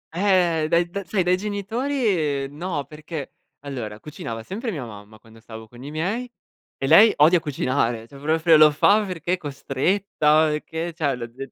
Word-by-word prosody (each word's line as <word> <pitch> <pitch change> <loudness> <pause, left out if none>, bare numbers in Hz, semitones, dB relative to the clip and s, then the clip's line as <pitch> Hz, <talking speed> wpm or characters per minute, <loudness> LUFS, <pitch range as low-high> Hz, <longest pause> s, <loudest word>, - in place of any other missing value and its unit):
Ehm, 175 -4 +2
dai 170 +1 +2
dai 200 -1 -5
sai 190 -4 0
dai 180 +1 +3
genitori, 225 +7 -3 0.4
ehm, 140 +2 -11
no, 165 -4 -3
perché 150 -1 -8 0.3
allora 120 -7 -6
cucinava 140 - -7
sempre 220 - -5
mia 145 - -4
mamma, 105 0 -12
quando 115 +1 -18
stavo 110 -1 -11
con 120 +2 -14
i 145 - -7
miei 205 +11 -3 0.5
e 135 - -3
lei 205 +9 +8
odia 165 +4 +5
cucinare, 130 -6 -1
cioè 140 - -14
proprio 160 +2 +3
lo 155 0 +8
fa 200 +8 +3
perché 175 -2 -3
è 185 - +1
costretta, 155 +1 +1
o 150 - -1
che, 165 +1 -5
cioè 150 -5 -1
lo 120 -1 -6
de 130 +3 -10
155 Hz, 180 wpm, -23 LUFS, 135-185 Hz, 0.5 s, lei